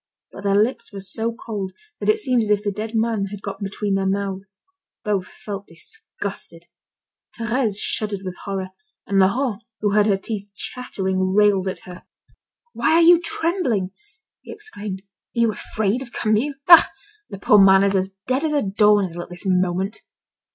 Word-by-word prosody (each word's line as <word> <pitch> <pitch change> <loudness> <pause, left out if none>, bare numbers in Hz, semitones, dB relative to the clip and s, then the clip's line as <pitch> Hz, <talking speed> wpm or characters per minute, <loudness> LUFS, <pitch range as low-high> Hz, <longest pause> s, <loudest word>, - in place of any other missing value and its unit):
But 200 - -10
their 200 0 +3
lips 235 +3 +1
were 200 - -7
so 220 +4 -2
cold 210 -5 -5 0.3
that - - -1
it 430 - +5
seemed 255 - +1
as 215 - -2
if 210 0 +2
the 205 - 0
dead 215 +3 -5
man 220 -2 +1
had 200 0 -8
got 200 -1 -5
between 200 0 -2
their 195 0 +1
mouths. 195 0 -3 0.5
Both 200 -4 -1
felt 200 -1 -8
disgusted. 435 - -7 0.7
Thérèse 230 -2 0
shuddered 210 -3 -1
with 185 -1 -5
horror, 195 -2 -3 0.4
and 195 -1 +1
Laurent 215 +3 +2 0.2
who 205 -1 +1
heard 210 +1 +4
her 200 -2 +3
teeth 200 0 -6
chattering, 190 -7 -2
railed 205 -2 +4
at 185 - -3
her: 180 -1 -11 0.7
"Why 315 - +2
are 335 - +6
you 345 0 +8
trembling?" 325 - -1 0.5
he - - -11
exclaimed. 210 - -7 0.3
"Are - - -1
you 230 -1 +4
afraid 215 +3 -2
of 250 -3 -9
Camille? 220 +7 0
Ah! 340 -2 +9 0.4
the 195 - -7
poor 210 +2 +5
man 195 0 +6
is 200 0 +2
as 190 0 +1 0.2
dead 260 +4 0
as 310 -1 0
a 290 - +2
doornail 200 -3 +2
at - - -9
this 175 +3 -9
moment." 185 +2 0
205 Hz, 175 wpm, -22 LUFS, 195-230 Hz, 0.7 s, Ah